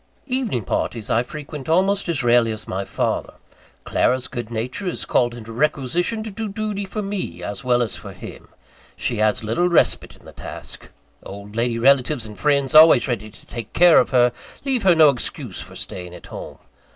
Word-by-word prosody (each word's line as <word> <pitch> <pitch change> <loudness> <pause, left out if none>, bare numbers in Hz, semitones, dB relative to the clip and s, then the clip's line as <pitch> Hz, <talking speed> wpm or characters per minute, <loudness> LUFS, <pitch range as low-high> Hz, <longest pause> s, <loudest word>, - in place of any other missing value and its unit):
Evening 250 - -2
parties 110 +2 -2
I 115 - +3
frequent 150 +2 -8
almost 190 +3 +2
as 155 -6 0
rarely 120 -1 +4
as 110 -1 -6
my 95 +1 -3
father. - - -2 0.5
Clara's 130 0 +1
good 120 -3 -6
nature 120 - -4
is 180 - -3
called 120 -1 +1
into 115 -1 -9
requisition 150 - 0
to 220 - -6
do 220 +1 -4
duty 205 -1 -3
for 210 +2 -4
me, 185 - -4
as 100 +1 -5
well 125 -1 +3
as 110 - -4
for - - -9
him. - - -11 0.5
She 120 - -2
has 110 0 +1
little 115 +12 +1
respite 170 - +2
in - - -21
the - - -11
task. - - -9 0.3
Old 100 +1 -10
lady 115 0 0
relatives 130 0 +3
and 105 -1 -10
friends, 140 +1 +1
always 155 -4 +8
ready 110 -4 -3
to - - -18
take 115 -3 -8
care 175 -1 +7
of - - +1
her, 125 -2 +4 0.3
leave 265 -3 0
her 185 -3 +5
no 155 -2 +7
excuse 125 - -3
for - - -11
staying 90 -1 -6
at - - -13
home. - - -9
130 Hz, 190 wpm, -21 LUFS, 115-175 Hz, 0.5 s, always